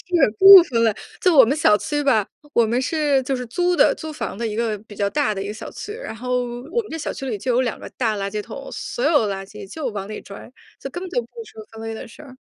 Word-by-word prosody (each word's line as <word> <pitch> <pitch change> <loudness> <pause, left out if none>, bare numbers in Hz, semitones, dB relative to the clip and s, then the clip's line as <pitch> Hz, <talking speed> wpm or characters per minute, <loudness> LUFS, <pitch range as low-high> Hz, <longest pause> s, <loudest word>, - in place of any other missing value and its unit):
是 275 -10 +4
不 390 -1 +11
分 230 -8 0
类。 220 -3 +2 0.3
就 365 -4 +4
我 265 -4 +9
们 265 +5 0
小 210 -9 +4
区 290 +8 -2
吧， 225 -8 +3 0.3
我 235 - +4
们 235 +3 0
是 290 -1 +1
就 270 +1 -1
是 250 -1 -5
租 355 +9 0
的， - - +5
租 315 -1 -7
房 - - -5
的 230 +1 -2
一 210 - -4
个 225 -2 -1
比 210 0 -14
较 200 0 0
大 280 -4 0
的 195 - -3
一 - - -6
个 210 - -4
小 215 - -8
区， - - -8
然 455 - -7
后 250 +2 -1 0.3
我 470 - +1
们 425 - -13
这 325 - -5
小 310 - -4
区 270 - -7
里 225 -5 -2
就 250 +5 -1
有 250 - +3
2 245 -3 -2
个 - - -8
大 225 -4 -1
垃 200 0 -3
圾 210 0 -3
桶， 240 +5 -9
所 240 - -5
有 290 -7 +3
垃 195 -1 -4
圾 195 - -11
就 310 +2 -4
往 200 -3 -6
里 215 - -6
拽， 200 +4 -11 0.3
就 270 - -6
根 355 +6 -6
本 375 - -6
就 - - 0
不 - - -14 0.2
说 220 - -12
分 225 0 -10
类 225 0 -5
的 220 - -8
事 230 - -14
儿。 265 -3 -13
250 Hz, 310 characters per minute, -21 LUFS, 215-300 Hz, 0.3 s, 不